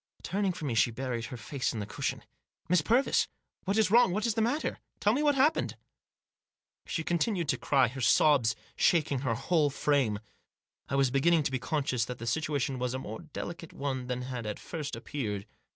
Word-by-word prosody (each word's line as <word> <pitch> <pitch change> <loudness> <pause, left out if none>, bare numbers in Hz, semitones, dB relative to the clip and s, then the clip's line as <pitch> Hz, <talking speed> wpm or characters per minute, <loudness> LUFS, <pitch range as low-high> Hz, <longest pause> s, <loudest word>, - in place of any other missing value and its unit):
Turning 195 +2 0
from 160 -4 -5
me, 125 - -1
she 115 +1 +4
buried 120 -1 -3
her 125 - -7
face 130 +4 -2
in 115 - -4
the 105 - -3
cushion. 100 - -3 0.4
"Miss 180 -1 +4
Purvis! 240 - +3 0.4
What 195 +2 0
is 220 -3 +3
wrong? 235 -4 +6
What 210 +4 0
is 230 - +2
the 225 - 0
matter? 245 +8 0 0.2
Tell 210 - +3
me 275 - +1
what 295 -1 +3
has 265 - +5
happened." 310 +2 +1 1.1
She 160 - -2
continued 175 +1 0
to - - +2
cry, 135 -3 +3
her 130 +3 -6
sobs 120 -3 +4 0.2
shaking 155 -5 +2
her 130 -3 0
whole 150 +4 +2
frame. 135 -6 +1 0.7
I - - -1
was 135 -2 +3
beginning 155 +4 +3
to 140 - -1
be 130 - -1
conscious 130 -6 0
that 125 0 -6
the 115 - -7
situation 140 +1 -1
was 125 0 -1
a - - 0
more 110 -4 -6
delicate 165 +1 -7
one 130 -3 -3
than 125 0 -2
had 125 -3 -5
at 105 - -3
first 150 -4 -5
appeared. 105 -8 -4
140 Hz, 200 wpm, -30 LUFS, 125-175 Hz, 1.1 s, wrong